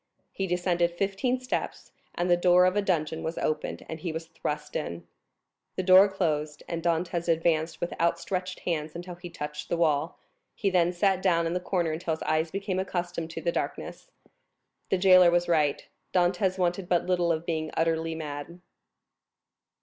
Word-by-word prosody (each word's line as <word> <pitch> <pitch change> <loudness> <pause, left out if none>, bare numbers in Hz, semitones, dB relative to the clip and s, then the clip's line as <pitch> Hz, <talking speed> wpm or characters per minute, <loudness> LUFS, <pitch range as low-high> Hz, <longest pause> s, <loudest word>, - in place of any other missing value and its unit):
He 195 - -3
descended 175 -1 +1
fifteen 200 +7 0
steps, 255 0 -4 0.2
and 175 - 0
the 175 - +5
door 180 +1 +5
of 185 +1 +2
a 205 - +3
dungeon 160 -5 -1
was 160 +1 -4
opened, 155 - -2
and 160 - -6
he 170 +1 -3
was 160 +1 -5
thrust 150 -2 -5
in. 85 - -4 0.7
The 185 - -1
door 190 +2 +7
closed, 155 -6 -2
and 170 -1 -3
Dantès 170 +1 -1
advanced 165 -1 +1
with 175 - -3
outstretched 180 +2 -1
hands 155 -3 -2
until 175 +1 -6
he 175 0 -9
touched 150 -2 -6
the 170 - 0
wall; 155 0 +1 0.4
he 195 - 0
then 175 -1 +3
sat 190 +1 +1
down 170 -3 +2
in 165 - -1
the 180 - 0
corner 180 -2 -1
until 160 0 -2
his - - -8
eyes 155 +1 +1
became 195 0 -2
accustomed 175 -3 -3
to 165 - -6
the - - 0
darkness. - - -5 0.8
The 190 - +2
jailer 185 -1 +7
was 175 0 +2
right; 155 -4 +1 0.3
Dantès 185 +1 +2
wanted 180 0 -1
but 175 -1 +2
little 175 -2 +1
of 160 0 -2
being 160 -2 -2
utterly 165 0 0
mad. 150 +2 -6
175 Hz, 175 wpm, -27 LUFS, 160-185 Hz, 0.8 s, door